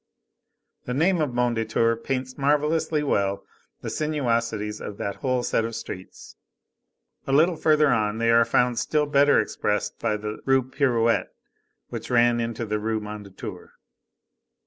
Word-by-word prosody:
The 125 - -3
name 170 +4 +2
of 150 - +1
Mondétour 115 -1 0
paints 130 -1 -3
marvellously 150 +2 +1
well 100 -7 0 0.4
the - - -5
sinuosities 115 -8 -1
of 105 - -7
that 100 - -4
whole 130 -2 -1
set 115 - +1
of 115 0 -4
streets. 95 0 -9 0.9
A - - -1
little 165 +5 +4
further 155 -1 +3
on, 110 -3 +1
they 115 0 +2
are 115 0 +6
found 125 0 +1
still 150 -1 +1
better 145 0 +4
expressed 105 -1 -2
by 105 - 0
the 105 +1 -6
Rue 135 -1 +3
Pirouette, 120 -3 +1 0.6
which - - -6
ran 120 -1 +3
into 115 0 -3
the 105 0 -2
Rue 110 +1 -1
Mondétour. 105 -2 -9
120 Hz, 145 wpm, -25 LUFS, 110-140 Hz, 0.9 s, are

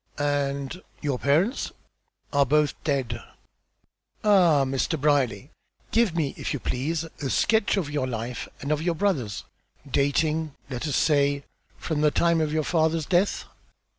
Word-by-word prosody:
"And 145 +2 -1 0.2
your 140 -4 -1
parents?" 170 - +1 0.6
"Are 140 0 +5
both 150 +2 +2
dead." 130 -6 -1 1.0
"Ah! 175 -9 +5
Mr. 135 +4 -1
Brierly, 135 -3 +1 0.4
give 225 -7 +2
me, 155 -5 0
if - - -3
you - - -4
please, 150 +8 -2
a 150 -4 -6
sketch 220 +4 +2
of 180 -6 0
your 145 -3 -1
life 120 0 -4
and 140 - -3
of 150 0 +1
your 170 0 0
brother's, 150 - -1 0.4
dating, 150 +2 +1 0.2
let 125 +4 -3
us 145 - -1
say, 140 -2 +2 0.3
from 155 -3 -2
the 150 - +5
time 170 +2 +2
of 155 -1 0
your 155 0 +1
father's 160 0 +1
death." 185 +2 +1
150 Hz, 145 wpm, -26 LUFS, 140-165 Hz, 1.0 s, Are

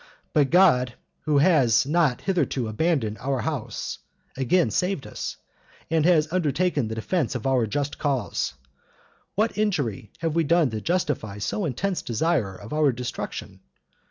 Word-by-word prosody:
But 145 -3 +3
God, 130 -10 +4 0.3
who 150 -2 +3
has 140 -8 +4
not 150 -4 +2
hitherto 150 - 0
abandoned 110 -2 0
our 135 -1 -1
house, 150 -8 -4 0.4
again 135 +7 +2
saved 180 -6 -1
us, - - -5 0.5
and 160 -1 +2
has 160 -2 +3
undertaken 160 -5 +1
the 110 - -4
defense 130 - -1
of 120 - -4
our 130 -4 +2
just 145 +6 -2
cause. 130 - -1 0.8
What 215 +1 0
injury 140 - -1
have 165 -2 -2
we 165 0 +2
done 160 -3 +3
to 110 -1 -4
justify 150 - -1
so 140 - -2
intense 175 +7 -1
desire 120 - 0
of 100 +7 -9
our 150 -2 +3
destruction? 125 0 -6
145 Hz, 145 wpm, -25 LUFS, 120-170 Hz, 0.8 s, God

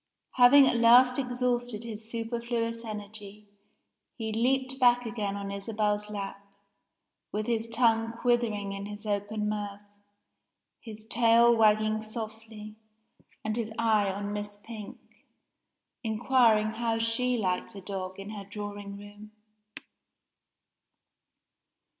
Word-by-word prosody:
Having 265 +2 +8
at 240 - +2
last 250 +3 +6
exhausted 245 -3 -1
his 220 -1 -7
superfluous 230 0 -3
energy, 210 -1 -7 0.7
he 220 -2 -4
leaped 260 +3 0
back 245 -1 +4
again 210 -3 -3
on 200 0 -5
Isabel's 210 +1 -1
lap, 200 -1 -6 0.9
with 210 +1 -2
his 230 -1 -1
tongue 225 -1 +2
quivering 230 -4 0
in 195 0 -6
his 205 +1 -9
open 210 +1 -2
mouth 205 -1 -4 1.0
his 220 -2 -11
tail 235 +1 +5
wagging 215 0 +3
softly, 220 -1 -8 0.7
and 215 0 -1
his 230 -2 -2
eye 220 -3 +2
on 200 +1 -4
Miss 205 0 -5
Pink, 220 -3 -9 1.1
inquiring 220 -1 +3
how 225 0 -1
she 230 +2 +1
liked 190 +1 -2
a 195 - -8
dog 190 -1 -6
in 195 +2 -7
her 205 -2 -7
drawing 205 0 -7
room! 205 +1 -12
220 Hz, 115 wpm, -28 LUFS, 205-235 Hz, 1.1 s, Having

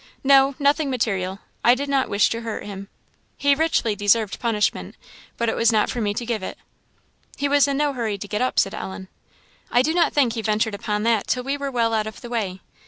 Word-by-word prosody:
no 275 0 +5
nothing 285 +1 +2
material; 195 -7 -1 0.3
I 240 - +6
did 280 +2 -4
not 275 -2 +1
wish 200 0 +2
to 230 - -3
hurt 225 -2 -5
him. 200 -1 -7 0.5
He 285 0 +3
richly 280 -8 +1
deserved 205 0 +1
punishment, 225 -4 -1 0.4
but 235 - 0
it 225 - 0
was 230 0 +3
not 215 -2 +2
for 245 - -3
me 205 -1 0
to 240 - -3
give 230 -3 -2
it." - - -6 0.8
"He 285 - 0
was 285 0 +4
in 280 -1 -1
no 290 -1 +1
hurry 225 -5 -2
to 205 - -7
get 210 +2 -2
up," 255 - -1
said 195 - +2
Ellen. 190 0 -7 0.6
"I 245 - +3
do 315 +4 0
not 345 -1 +3
think 260 -6 +2
he 230 - -3
ventured 215 0 0
upon 210 +1 -2
that 225 -2 +1
till 250 - 0
we 275 +2 -1
were 280 -1 -4
well 230 -3 0
out 215 -1 0
of 220 - -9
the 240 - -8
way. 195 -6 -3
230 Hz, 230 wpm, -22 LUFS, 210-275 Hz, 0.8 s, I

